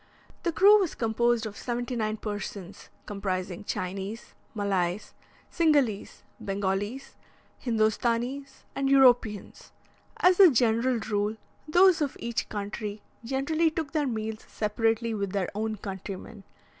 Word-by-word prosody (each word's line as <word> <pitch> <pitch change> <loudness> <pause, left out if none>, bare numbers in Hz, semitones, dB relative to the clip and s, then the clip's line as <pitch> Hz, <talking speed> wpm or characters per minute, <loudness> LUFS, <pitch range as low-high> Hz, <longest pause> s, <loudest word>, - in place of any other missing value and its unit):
The 340 - 0
crew 405 +5 +7
was 370 -5 -1
composed 235 0 +1
of 210 -2 -6
seventy 245 +2 -3
nine 215 -1 -1
persons, 205 -3 -7 0.2
comprising 190 -2 -3
Chinese, 195 +5 -5 0.2
Malays, 195 -2 -1 0.4
Cingalese, 285 - +1 0.2
Bengalese, 200 +5 -3 0.5
Hindostanese, 240 +4 -1
and 275 0 0
Europeans. 245 -6 +3 0.5
As 365 +1 +4
a 380 -3 +10
general 240 -1 +2
rule, 210 0 -1 0.3
those 355 +1 +5
of 285 -3 -1
each 235 -1 -3
country 205 0 -5 0.2
generally 280 +7 +1
took 315 -2 -4
their 300 -3 0
meals 220 -2 -4
separately 225 +2 0
with 200 -2 -3
their 195 -3 -1
own 215 +1 -2
countrymen. 195 +1 -8
225 Hz, 120 wpm, -27 LUFS, 205-265 Hz, 0.5 s, a